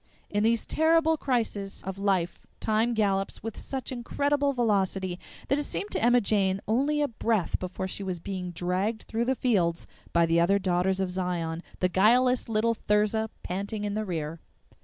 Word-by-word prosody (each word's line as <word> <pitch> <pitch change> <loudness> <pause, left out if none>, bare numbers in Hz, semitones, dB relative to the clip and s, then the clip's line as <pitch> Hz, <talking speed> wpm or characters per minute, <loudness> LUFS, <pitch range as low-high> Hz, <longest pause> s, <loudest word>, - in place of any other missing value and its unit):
In 205 - +1
these 230 +1 +2
terrible 320 0 +3
crises 225 -8 -2
of 190 0 -5
life 190 -4 0 0.2
time 225 +2 +1
gallops 195 -3 0
with 225 -2 -4
such 265 -2 -5
incredible 285 +3 0
velocity 195 -7 0 0.3
that 275 - +2
it - - -1
seemed 195 -3 -4
to - - -1
Emma 245 +1 +6
Jane 195 -2 +1
only 285 +7 +2
a - - +2
breath 220 -5 0
before 185 +1 -4
she 190 - -5
was 185 -3 -3
being 185 0 -4
dragged 185 +6 -1
through 230 +1 -2
the 265 +2 +1
fields 180 -10 +1 0.3
by 170 0 +4
the 165 0 +3
other 185 +4 +4
Daughters 185 0 +1
of 190 -1 -1
Zion, 175 -3 -2 0.2
the 185 - +4
guileless 240 +7 +3
little 225 +1 +2
Thirza 215 +1 +1
panting 200 +3 -3
in 205 -1 -2
the 215 +1 -1
rear. 165 -4 -4
205 Hz, 175 wpm, -28 LUFS, 185-235 Hz, 0.3 s, Emma